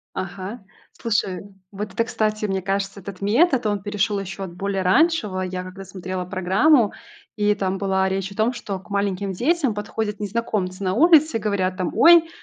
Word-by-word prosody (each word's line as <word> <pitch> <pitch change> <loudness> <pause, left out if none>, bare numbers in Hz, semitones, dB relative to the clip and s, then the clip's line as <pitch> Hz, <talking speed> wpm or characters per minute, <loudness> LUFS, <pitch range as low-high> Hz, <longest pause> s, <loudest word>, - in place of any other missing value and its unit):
Ага. 190 +4 -6 0.4
Слушай, 200 -5 0 0.3
вот 205 0 -6
это, 230 - +1
кстати, 215 -1 -1
мне 190 -1 -1
кажется, 195 +1 -2
этот 190 -1 -9
метод, 245 - +3
он 205 -1 0
перешел 205 +1 -1
еще 195 0 -6
от 190 -3 -6
более 195 +1 -2
раньшего. 205 - +2
Я 185 0 -3
когда 190 +1 -9
смотрела 185 -1 -5
программу, 200 - +3 0.4
и 210 0 +2
там 195 -1 -2
была 190 -1 +1
речь 190 0 -2
о - - -13
том, 220 +3 +2
что 205 -5 -5
к 195 - -20
маленьким 200 -1 -1
детям 270 - +1
подходят 210 0 -4
незнакомцы 205 -3 -2
на 185 -1 0
улице 315 - +5
и - - -8
говорят 195 -3 -1
там: 185 -2 -2
"Ой, 335 -1 +7
200 Hz, 180 wpm, -22 LUFS, 190-220 Hz, 0.4 s, Ой